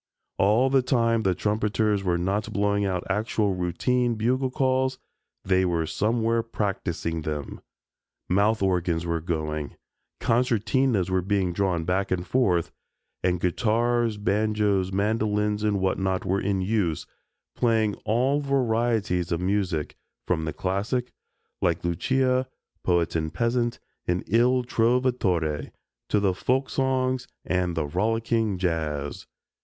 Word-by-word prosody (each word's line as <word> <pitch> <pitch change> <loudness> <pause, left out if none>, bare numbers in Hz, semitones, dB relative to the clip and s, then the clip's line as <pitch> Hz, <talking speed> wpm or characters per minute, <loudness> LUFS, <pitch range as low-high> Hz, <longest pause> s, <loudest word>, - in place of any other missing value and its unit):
All 110 +7 +4
the 135 -1 +5
time 115 -3 +2
the 95 -4 +1
trumpeters 105 0 0
were 90 -2 +1
not 100 +4 -1
blowing 100 0 +1
out 90 -2 -1
actual 105 0 0
routine 120 +8 0
bugle 130 +4 +1
calls, 130 0 +1 0.5
they 95 0 +3
were 85 -3 0
somewhere 115 +5 +1
practicing 95 -7 -3
them. 75 -2 -5 0.7
Mouth 100 +3 +2
organs 90 -3 0
were 85 -1 -1
going, 75 -3 -3 0.4
concertinas 115 -3 +1
were 95 0 +2
being 95 -1 0
drawn 90 -3 0
back 95 +3 0
and 90 -1 -1
forth, 95 -10 +1 0.5
and 90 -1 +1
guitars, 115 +4 +1
banjos, 105 -2 +1
mandolins 105 +1 0
and 105 -2 +1
whatnot 95 +2 0
were 95 +2 0
in 95 -1 0
use 95 -5 0 0.5
playing 110 -3 +2
all 130 +6 +2
varieties 115 - 0
of 85 - 0
music, 90 -4 -1 0.3
from 80 -3 0
the 80 - -2
classic, 105 +7 -2 0.5
like - - +1
"Lucia," 130 +8 +1 0.4
"Poet 85 -2 +1
and 80 -1 -1
Peasant," 120 0 0 0.3
and 90 +1 0
"Il 125 +4 +3
Trovatore" 115 - +1 0.4
to 105 - +3
the 100 -2 +2
folksongs 130 +3 0 0.2
and 90 -2 0
the 80 - +1
rollicking 110 +4 0
"Jazz." 80 -5 -2
105 Hz, 125 wpm, -25 LUFS, 90-115 Hz, 0.7 s, the